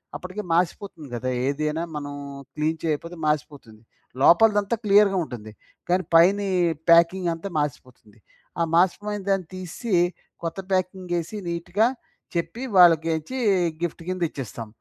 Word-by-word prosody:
అప్పటికే 185 +3 -6
మాసిపోతుంది 170 -2 -1
గదా! 130 +2 -3 0.2
ఏదైనా 150 +3 -1
మనం 145 -1 -5 0.4
క్లీన్ 155 +1 -1
చేయపోతే 165 +2 -2
మాసిపోతుంది. 145 -7 -3 0.4
లోపలదంతా 205 +6 +5
క్లియర్‌గా 200 -1 +5
ఉంటుంది. 110 -7 -8 0.4
కానీ 185 +1 +2
పైని 195 +4 +5 0.4
ప్యాకింగ్ 170 +2 +5
అంతా 165 +4 -6
మాసిపోతుంది. 125 -6 -6 0.4
ఆ - - +2
మాసిపోయినదాన్ని 195 +1 +1
తీసి 185 +4 -5 0.5
కొత్త 165 +3 -4
ప్యాకింగ్ 185 -1 -1
ఏసి, 170 +6 -6
నీట్‌గా 175 +6 +1 0.5
చెప్పి 170 +7 -3 0.2
వాళ్ళకేంచ్చి 165 +5 +4 0.4
గిఫ్ట్ 170 -1 -3
కింద 185 0 -3
ఇచ్చేస్తాం. 115 -4 -7
170 Hz, 115 wpm, -24 LUFS, 150-190 Hz, 0.5 s, లోపలదంతా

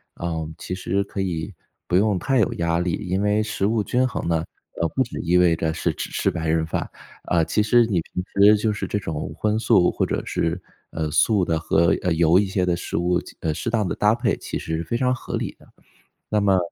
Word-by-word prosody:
呃， 80 -2 -3
其 90 - -6
实 95 +1 -1
可 100 0 -5
以 90 0 -3 0.3
不 90 - 0
用 100 0 +3
太 130 +8 +1
有 110 - +2
压 85 0 0
力， 90 -1 -1
因 95 -2 -2
为 105 +1 +2
食 110 -2 -2
物 110 -1 +1
均 125 +4 +1
衡 120 - -4
呢， 80 -1 +1 0.4
呃， 85 - +2
不 130 - +3
只 120 - -7
意 90 +1 +2
味 85 -2 +4
着 80 0 -1
是 85 - -1
只 - - -5
吃 - - 0
白 80 0 -3
人 80 0 +1
饭， 80 - -3 0.4
啊， 85 -2 +2
其 105 - +1
实 120 +3 +4
你 95 -7 0
平 90 +2 -5
时 105 +2 +6
就 105 +1 0
是 105 - -4
这 - - -1
种 80 -7 -4
荤 105 0 0
素 105 -6 +4
或 - - -1
者 - - -1
是， 85 +2 -1 0.3
呃， 80 -2 -3
素 95 +4 +3
的 80 -1 0
和， 85 +1 +2
呃， 90 - 0
油 85 +2 +4
一 100 - +2
些 95 -1 0
的 90 -1 +1
食 85 - -4
物 90 +1 +1
进 - - -14
呃， 80 - 0
适 115 - -3
当 110 -4 0
地 - - -1
搭 105 +2 +3
配 120 - 0
其 - - -5
实 80 - -3
是 85 - -3
非 85 +8 -2
常 125 +1 +2
合 130 - -5
理 - - -4
的。 - - -19 0.6
那 105 - +1
么 95 -2 +4
90 Hz, 260 characters per minute, -23 LUFS, 85-105 Hz, 0.6 s, 时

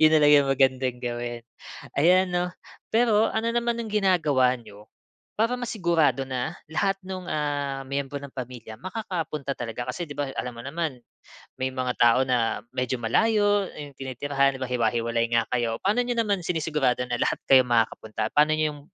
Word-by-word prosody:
'Yon 155 - +8
na - - +4
lang 145 - +6
yung 140 -1 +4
magandang 130 -2 +2
gawin, 120 -1 -4 0.6
ayan 180 +5 +5
'no. 180 0 -1 0.4
Pero, 225 -2 +4
ano 225 +1 -1
naman 235 0 0
ang 225 - -4
ginagawa 160 -11 +3
nyo, 105 -2 -14 0.5
para 230 +3 +2
masigurado 170 - +1
na 125 -2 -2 0.2
lahat 195 +4 0
nung, 185 -1 -6
ah, 145 -3 -2
miyembro 140 +1 -3
ng 140 -2 -9
pamilya, 125 -3 -7
makakapunta 165 - -4
talaga? 120 +1 -5
Kasi 170 +7 -3
'di 145 - -8
ba, 145 -2 -1
alam 125 -1 -3
mo 115 - -9
naman, 145 -2 -3 0.6
may 130 0 0
mga 130 -1 -2
tao 120 +1 +6
na 120 -3 +1
medyo 125 0 -1
malayo, 205 - +2
yung 145 -2 -8
tinitirahan 135 +1 0
'di - - -13
ba 125 - -5
hiwa-hiwalay 115 -1 0
nga 115 -1 +3
kayo. 115 -2 0
Paano 215 +5 +3
n'yo 245 -1 -2
naman 205 -5 +1
sinisigurado 150 -7 0
na 120 0 -2
lahat - - +1
kayo 130 -1 +7
makakapunta? 115 -2 0
Paano 150 +1 +5
n'yo 155 - +1
yung 145 - -12
140 Hz, 175 wpm, -25 LUFS, 125-180 Hz, 0.6 s, Yon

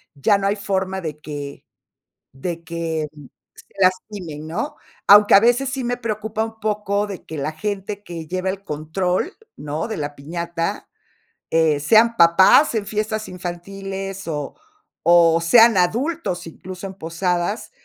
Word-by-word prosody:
ya 200 +9 +3
no 195 - -1
hay 200 - +1
forma 190 -2 -2
de 155 -3 -6
que 145 -2 -7 0.7
de 165 +5 -5
que, 165 -2 -3
mm, 150 -2 -13 0.3
se - - -19
lastimen, 185 -4 -1
¿no? 285 - -3 0.3
Aunque 205 +1 +8
a 195 - +9
veces 245 +4 +3
sí 260 -1 -3
me 245 +1 -1
preocupa 220 -2 -3
un 225 0 -9
poco 210 -1 -1
de 195 -3 -8
que 160 - -7
la 145 +2 -2
gente 205 +3 -4
que 165 -3 -7
lleva 185 +3 -2
el 195 +1 -7
control, 180 - -2 0.2
¿no?, 150 +1 -4
de 220 - -4
la 145 -1 -4
piñata, 170 +3 -4 0.6
eh, 160 -2 +3
sean 225 +8 +5
papás 190 - +6
en 215 -2 -1
fiestas 215 0 -2
infantiles, 195 +2 -6
o 150 -3 -4 0.5
o, 170 -1 +6
sean 225 +5 +6
adultos, 210 - 0
incluso 185 +3 -8
en 190 - -9
posadas, 175 +4 -2
185 Hz, 150 wpm, -21 LUFS, 165-210 Hz, 0.7 s, a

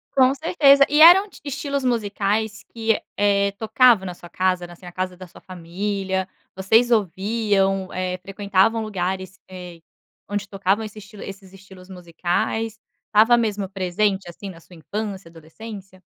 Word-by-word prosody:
Com 260 0 +5
certeza. 280 -2 +5
E 295 +1 +3
eram 370 +5 +9
t - - -16
estilos 280 -1 -3
musicais 210 -2 -1
que, 225 -1 0 0.2
eh, 200 -1 +2
tocavam 220 -2 +4
na 180 - -5
sua 175 0 -14
casa, 185 -1 -1
na 175 - -12
assim, 180 - -16
a 175 - -9
casa 185 0 -4
da 185 - -10
sua 175 - -17
família? 190 +2 -4 0.3
Vocês 225 +6 +3
ouviam, 195 -1 0
eh, 185 0 -3
frequentavam 200 +3 +1
lugares, 185 -2 -4
eh, 180 -2 -10 0.5
onde 205 0 -3
tocavam 195 +2 0
esse 215 0 -10
estilo 210 0 -12
esses 195 -1 -10
estilos 190 -1 -15
musicais? 190 +5 -3 0.3
Estava 225 +3 +5
mesmo 210 -4 -1
presente, 190 0 -1
assim, 195 +3 -9
na 165 - -14
sua 175 +1 -17
infância, 195 +1 -6
adolescência? 185 +4 -12
200 Hz, 150 wpm, -22 LUFS, 185-220 Hz, 0.5 s, eram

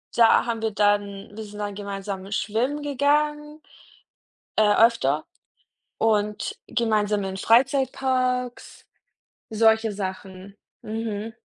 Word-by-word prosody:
da 230 -1 +5
haben 230 -2 -3
wir 225 - 0
dann 205 -1 0
wir 220 - -6
sind 210 -1 -11
dann 205 -1 -4
gemeinsam 195 -1 -6
schwimmen 245 +9 -1
gegangen 295 +2 0 1.0
äh, 210 -1 +4
öfter 155 - +1 0.7
und 210 -1 0
gemeinsam 215 -3 0
in 190 0 -5
Freizeitparks, 255 +1 +1 0.6
solche 220 0 +3
Sachen. 190 0 -7 0.3
Mhm. 220 0 -4
220 Hz, 100 wpm, -24 LUFS, 205-245 Hz, 1.0 s, da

